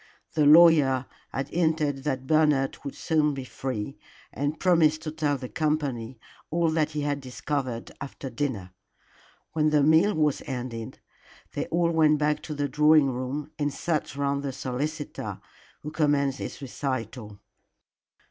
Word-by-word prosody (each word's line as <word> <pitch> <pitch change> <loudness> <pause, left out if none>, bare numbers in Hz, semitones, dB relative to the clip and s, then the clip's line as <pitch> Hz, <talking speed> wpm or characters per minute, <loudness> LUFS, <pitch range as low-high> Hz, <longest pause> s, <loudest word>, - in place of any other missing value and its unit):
The 150 -2 +3
lawyer 150 -5 +6 0.3
had 135 - -3
hinted 155 -5 0
that 130 -3 -2
Bernard 150 -2 +3
would 140 - -6
soon 150 -3 +1
be 135 - -5
free, 130 -1 -5 0.3
and 145 +2 -2
promised 160 -4 +3
to 155 - -4
tell 150 -2 0
the 130 -1 -6
company 135 -6 -2 0.3
all 165 0 +1
that 155 -1 0
he 150 - -2
had 145 -1 -1
discovered 130 -2 -4
after 140 0 -7
dinner. 115 -11 -3 0.8
When 155 -1 +2
the 150 -2 +3
meal 160 +7 +4
was 150 -3 +1
ended 120 -4 -5 0.6
they - - -3
all 170 0 +1
went 155 -2 +4
back 150 0 0
to 150 - -6
the 145 0 -1
drawing 150 -1 +4
room 130 +4 -4
and 145 -1 0
sat 155 -1 -2
round 140 0 0
the 140 -2 -4
solicitor, 140 +3 -4 0.4
who 150 - -5
commenced 145 -3 +1
his - - -6
recital. 120 -5 -4
145 Hz, 150 wpm, -26 LUFS, 135-155 Hz, 0.8 s, lawyer